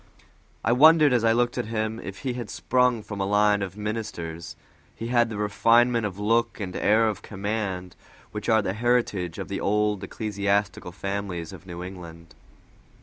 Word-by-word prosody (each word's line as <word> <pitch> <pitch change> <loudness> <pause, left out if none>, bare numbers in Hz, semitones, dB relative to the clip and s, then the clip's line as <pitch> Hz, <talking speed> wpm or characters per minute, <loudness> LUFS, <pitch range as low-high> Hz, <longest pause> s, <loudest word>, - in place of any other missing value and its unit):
I 115 - +3
wondered, 150 +2 +6
as 120 -2 +2
I 115 - +4
looked 120 +1 +1
at - - -2
him, 110 0 -2
if 100 0 -8
he 130 -3 -2
had 120 -3 -6
sprung 125 -3 +1
from 100 -2 -6
a - - +1
line 105 0 +3
of 95 0 -5
ministers; 105 -6 -5 0.4
he 115 - -5
had 120 -1 +3
the 110 - -5
refinement 115 +2 +3
of 95 -2 -8
look 115 +4 +1
and 95 -3 -5
air 110 +2 +3
of 105 -3 -3
command 100 -3 -4 0.4
which 105 +1 -5
are 110 -2 +4
the 95 - -1
heritage 105 -7 0
of - - -5
the 100 - -4
old 105 -1 +1
ecclesiastical 100 -2 -1
families 95 -3 -4
of 95 - -12
New 85 0 -6
England. 85 -3 -10
105 Hz, 175 wpm, -25 LUFS, 95-115 Hz, 0.4 s, wondered